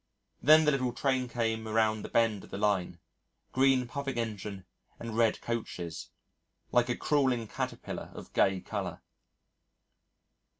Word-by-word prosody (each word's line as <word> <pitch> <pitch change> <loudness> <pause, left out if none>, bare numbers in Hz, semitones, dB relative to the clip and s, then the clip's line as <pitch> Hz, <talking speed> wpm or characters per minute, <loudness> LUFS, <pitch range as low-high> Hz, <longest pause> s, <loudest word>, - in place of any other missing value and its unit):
Then 155 +3 +7
the 150 - +5
little 130 -3 0
train 130 -2 0
came 115 -2 -1
around 110 0 +2
the - - -7
bend 115 -4 +2
of - - -13
the - - -5
line 100 -4 0 0.5
green 130 -1 +3
puffing 140 0 -4
engine 105 -4 -4 0.3
and 115 -2 -6
red 115 -1 +3
coaches, 90 -8 -4 0.6
like 120 0 +3
a 125 - 0
crawling 130 -6 +1
caterpillar - - -5
of - - -10
gay 95 -1 +3
colour. - - -5
115 Hz, 135 wpm, -30 LUFS, 105-130 Hz, 0.6 s, Then